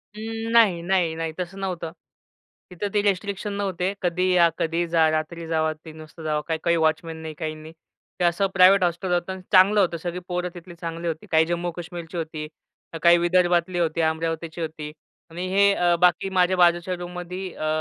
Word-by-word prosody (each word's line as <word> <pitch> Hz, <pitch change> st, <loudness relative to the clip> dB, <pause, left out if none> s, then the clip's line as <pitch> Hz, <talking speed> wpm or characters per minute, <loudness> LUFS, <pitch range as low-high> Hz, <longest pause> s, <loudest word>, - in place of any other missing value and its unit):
अं, 225 Hz, +1 st, -5 dB
नाही, 215 Hz, -7 st, +4 dB
नाही, 175 Hz, -2 st, +1 dB
नाही, 165 Hz, 0 st, -3 dB
तसं 180 Hz, +2 st, -5 dB
नव्हतं. 180 Hz, -4 st, -4 dB, 0.8 s
तिथं 180 Hz, +3 st, -3 dB
ते 205 Hz, -, +3 dB
रिस्ट्रिक्शन 200 Hz, +1 st, -1 dB
नव्हते. 190 Hz, -2 st, -2 dB
कधीही 180 Hz, +1 st, +1 dB
या, 170 Hz, -1 st, +6 dB
कधीही 165 Hz, +1 st, 0 dB
जा, 165 Hz, -1 st, +3 dB
रात्री 155 Hz, +2 st, -3 dB
जावा, 160 Hz, -1 st, 0 dB
3:00 160 Hz, 0 st, -11 dB
वाजता 155 Hz, +1 st, -12 dB
जावा, 150 Hz, -1 st, -1 dB
काही, 160 Hz, -1 st, -1 dB
काही 170 Hz, 0 st, +3 dB
वॉचमन 160 Hz, +1 st, 0 dB
नाही, 160 Hz, -1 st, -7 dB
काही 155 Hz, -1 st, -5 dB
नाही. 155 Hz, +1 st, -12 dB, 0.5 s
ते -, -, 0 dB
असं 175 Hz, +3 st, +2 dB
प्रायव्हेट 185 Hz, +1 st, +6 dB
हॉस्टल 180 Hz, +1 st, -1 dB
होतं 175 Hz, +1 st, -1 dB
अन् 190 Hz, -, -9 dB
चांगलं 195 Hz, +2 st, +6 dB
होतं, 175 Hz, -4 st, +2 dB
सगळी 175 Hz, +2 st, -5 dB
पोरं 180 Hz, 0 st, -2 dB
तिथली 175 Hz, 0 st, -11 dB
चांगली 165 Hz, 0 st, -5 dB
होती. 160 Hz, -1 st, -4 dB
काही 160 Hz, 0 st, +4 dB
जम्मू-कश्मीरची 175 Hz, 0 st, -5 dB
होती. 155 Hz, -2 st, -4 dB, 0.5 s
अ, -, -, -4 dB
काही 170 Hz, 0 st, +7 dB
विदर्भातली 175 Hz, 0 st, +2 dB
होती, 165 Hz, -1 st, 0 dB
अमरावतीची 160 Hz, +1 st, -2 dB
होती. 155 Hz, -2 st, -5 dB, 0.4 s
आणि 175 Hz, +3 st, -5 dB
हे 200 Hz, +1 st, +5 dB
अ, 175 Hz, -2 st, +2 dB
बाकी 180 Hz, +2 st, +3 dB
माझ्या 180 Hz, +1 st, +3 dB
बाजूच्या 175 Hz, 0 st, +3 dB
रूममध्ये 180 Hz, +1 st, -6 dB
अ, 155 Hz, -, -4 dB
175 Hz, 185 wpm, -24 LUFS, 165-185 Hz, 0.8 s, काही